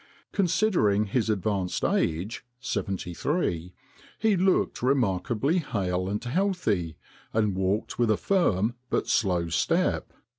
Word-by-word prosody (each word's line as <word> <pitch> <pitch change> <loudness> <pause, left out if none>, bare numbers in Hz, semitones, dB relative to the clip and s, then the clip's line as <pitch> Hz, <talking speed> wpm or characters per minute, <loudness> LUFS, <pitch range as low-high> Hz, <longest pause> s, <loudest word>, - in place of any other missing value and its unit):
Considering 175 - +2
his 110 +2 0
advanced 100 -3 -1
age, 90 +8 0 0.2
seventy 95 -8 -3
three, 90 - -1 0.5
he 220 -2 +2
looked 190 +1 +1
remarkably 125 - +1
hale 95 - -2
and 105 +1 -2
healthy, 130 - 0 0.4
and 105 -2 +2
walked 95 +5 -1
with 120 -2 +3
a 110 - +3
firm 120 - +1 0.2
but - - 0
slow 90 -5 +1
step." 80 -1 0
105 Hz, 115 wpm, -27 LUFS, 95-145 Hz, 0.5 s, with